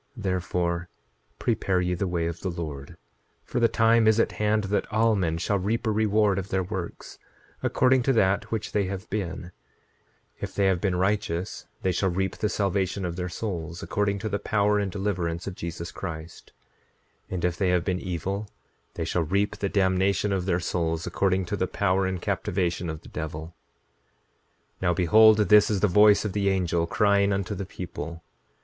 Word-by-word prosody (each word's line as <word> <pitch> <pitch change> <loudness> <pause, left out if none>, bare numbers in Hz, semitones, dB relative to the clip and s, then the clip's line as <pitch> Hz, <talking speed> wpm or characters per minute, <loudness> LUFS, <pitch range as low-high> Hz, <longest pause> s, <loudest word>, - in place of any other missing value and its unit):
9:28 110 - -8
Therefore, 90 -2 -1 0.5
prepare 95 -2 0
ye 90 0 0
the 95 +2 -1
way 85 -2 -1
of 85 0 -3
the 95 - -3
Lord, 75 -5 -6 0.5
for - - -2
the 115 - +5
time 115 0 +3
is 110 +1 +4
at - - +2
hand 105 0 +1
that 100 +1 -1
all 110 +1 +3
men 85 -5 0
shall 100 +4 0
reap 110 +6 -1
a 110 - +2
reward 105 -2 +2
of 95 +1 -6
their 95 0 0
works, 90 -2 -6 0.4
according 130 0 +3
to 135 +2 +2
that 100 -4 +2
which 110 -2 -3
they 100 -1 +1
have 95 +2 -5
been—if 90 -3 -8
they 100 - +2
have 95 -2 +2
been 95 -3 +1
righteous 95 -1 -1 0.2
they 95 - +2
shall 95 +2 +1
reap 95 +2 -1
the 105 - 0
salvation 100 -2 -1
of 85 -1 -3
their 90 0 -3
souls, 85 -4 -5
according 100 -1 0
to 110 +2 -4
the 100 -1 -1
power 105 -1 +2
and 100 -2 -1
deliverance 90 -4 -2
of 95 - -4
Jesus 85 -1 -6
Christ; 80 +1 -8 0.8
and 90 -1 -2
if 90 -1 0
they 95 0 +1
have 90 -1 +1
been 90 -2 0
evil 95 +4 -3 0.5
they - - -2
shall 90 - 0
reap 100 +6 0
the 100 - -1
damnation 95 +1 +2
of 95 -1 -2
their 90 -2 +2
souls, 85 -2 -1
according 95 -1 +1
to 95 - -2
the 95 -2 -1
power 95 -1 +1
and 95 -1 -2
captivation 85 -1 -1
of 80 -1 -5
the - - -14
devil. 80 +1 -5 1.3
9:29 - - -36
Now 90 -1 +2
behold, 110 +5 +6
this 105 -1 +5
is 100 -3 0
the 105 - +4
voice 105 +3 +5
of 100 - -2
the 100 -1 +1
angel, 85 -3 0
crying 100 +1 +3
unto 100 +1 -1
the 100 -1 -5
people. 85 -3 -7
95 Hz, 190 wpm, -26 LUFS, 90-105 Hz, 1.3 s, behold